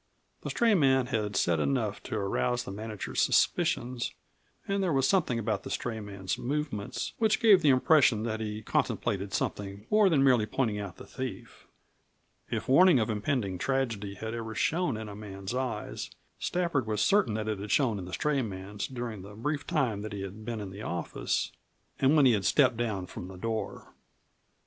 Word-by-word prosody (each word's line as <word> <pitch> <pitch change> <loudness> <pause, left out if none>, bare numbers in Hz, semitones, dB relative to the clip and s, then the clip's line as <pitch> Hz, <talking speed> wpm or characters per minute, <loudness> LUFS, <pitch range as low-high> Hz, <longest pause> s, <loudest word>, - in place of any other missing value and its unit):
The - - -5
stray 230 -2 +3
man 135 -7 +4
had 105 -5 -2
said 85 -2 +2
enough 110 - 0
to - - -4
arouse 120 +5 0
the 125 - -7
manager's 105 0 -3
suspicions, 120 0 +1 0.5
and 195 0 0
there 185 -3 +1
was 135 -2 +3
something 170 -11 +2
about 110 -2 -1
the - - -8
stray 115 -2 -3
man's 100 -3 -4
movements 135 -6 -3
which 215 -1 +3
gave 210 -5 +6
the 150 - +4
impression 130 -4 +4
that 110 -1 -2
he 110 0 -4
contemplated 100 -1 -1
something 100 +2 -3
more 210 -2 +5
than 145 -6 +3
merely 125 -5 +4
pointing 110 -2 0
out 100 -3 -6
the - - -10
thief. 130 -7 -7 0.8
If - - -3
warning 175 +4 +7
of 110 0 0
impending 105 -4 -1
tragedy 115 -7 -1
had 110 +3 -5
ever 110 -1 -5
shone 165 -4 +1
in 110 0 -6
a 100 - -8
man's 100 -1 -6
eyes, 130 -1 -3 0.3
Stafford 170 -9 0
was 105 -1 0
certain 195 - +3
that 110 0 -2
it 105 -2 -2
had 100 +1 -6
shone 115 -6 +2
in 90 - -6
the 90 - -9
stray 150 -2 +1
man's 100 -2 -5
during 120 -5 -5
the 100 +2 -11
brief 145 +6 -3
time 130 - 0
that 105 0 -6
he 100 - -4
had 100 +3 -8
been 115 0 -4
in 100 -2 -6
the 100 +2 -8
office 85 -5 -2 0.5
and 135 +3 +4
when 145 -3 +6
he 125 - +6
had 100 -3 0
stepped 130 -4 +4
down 110 -5 -2
from 90 - -8
the 95 0 -10
door. 110 +3 -4
110 Hz, 190 wpm, -29 LUFS, 105-135 Hz, 0.8 s, warning